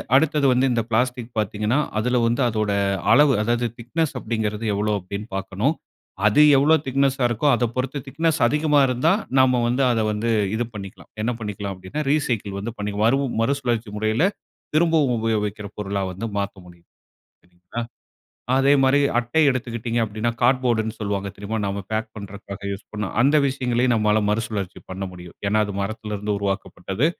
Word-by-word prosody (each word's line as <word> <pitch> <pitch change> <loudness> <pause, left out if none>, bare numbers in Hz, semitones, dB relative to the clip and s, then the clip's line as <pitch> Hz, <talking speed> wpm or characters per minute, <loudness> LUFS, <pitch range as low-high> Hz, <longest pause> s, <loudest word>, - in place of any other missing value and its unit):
அடுத்தது 150 0 +3
வந்து 125 +2 +2
இந்த 120 -1 +1
பிளாஸ்டிக் 125 +1 0
பாத்தீங்கன்னா, 105 +5 0 0.2
அதுல 125 +3 +1
வந்து 120 +3 0
அதோட 110 -2 -1 0.4
அளவு 145 -1 +6
அதாவது 120 +2 +1
திக்னஸ் 150 +6 -1
அப்படிங்கிறது 110 -1 -2
எவ்ளோ 105 +1 0
அப்டின்னு 100 +3 -6
பார்க்கணும். 100 - -1 0.5
அது 110 +8 +5 0.2
எவ்ளோ 150 +4 +5
திக்னெஸ்ஸா 135 0 +1
இருக்கோ 120 +5 0
அத 120 - -1
பொறுத்து 130 +2 -2
திக்னஸ் 160 +2 0
அதிகமா 150 +2 +2
இருந்தா 125 +6 +2 0.3
நம்ம 130 -1 +4
வந்து 125 +3 +1
அத 115 - +1
வந்து 105 +2 -2 0.3
இது 120 - 0
பண்ணிக்கலாம். 100 -2 -9
என்ன 115 +3 0
பண்ணிக்கலாம் 105 -2 -4
அப்டின்னா 95 +11 -5
ரீசைக்கிள் 115 -9 -1
வந்து 110 +4 -4
பண்ணிக்கலாம். 105 +1 -1
மறு 135 +4 +3 0.2
மறுசுழற்சி 120 -3 0
முறையில 110 +6 +1 0.5
திரும்பவும் 155 -6 +3
உபயோகிக்கிற 105 -2 -1
பொருளா 100 -1 -2
வந்து 95 +5 -5
மாத்த 100 0 -2
முடியும் 85 -1 -17 0.6
சரிங்ளா? 90 +5 -8 0.8
அதே 135 +1 +4
மாரி 135 +1 +4 0.2
அட்டை 120 +7 +1
எடுத்துக்கிட்டீர்ங்க 120 -2 -2
அப்டின்னா, 110 +2 -2
கார்ட்போர்டுன்னு 120 -3 +2
சொல்லுவாங்க 100 -1 -2
தெரியுமா? 105 +3 -4
நாம 100 0 -3
பேக் 110 +1 -1
பண்ணுறதுக்காக 100 -1 -8
யூஸ் 100 +1 -7
பண்வோம், 105 -2 -4
அந்த 140 +4 +4
விஷயங்களையும் 125 -2 +1
நம்மால 105 -1 +2
மறுசுழற்சி 105 -3 -3
பண்ண 95 +1 -4
முடியும். 90 -1 -12
ஏன்னா 110 +2 +2
அது 100 - -6
மரத்ல 105 +1 -4
இருந்து 105 +1 -2
உருவாக்கப்பட்டது. 100 +3 -2
110 Hz, 155 wpm, -23 LUFS, 105-130 Hz, 0.8 s, அளவு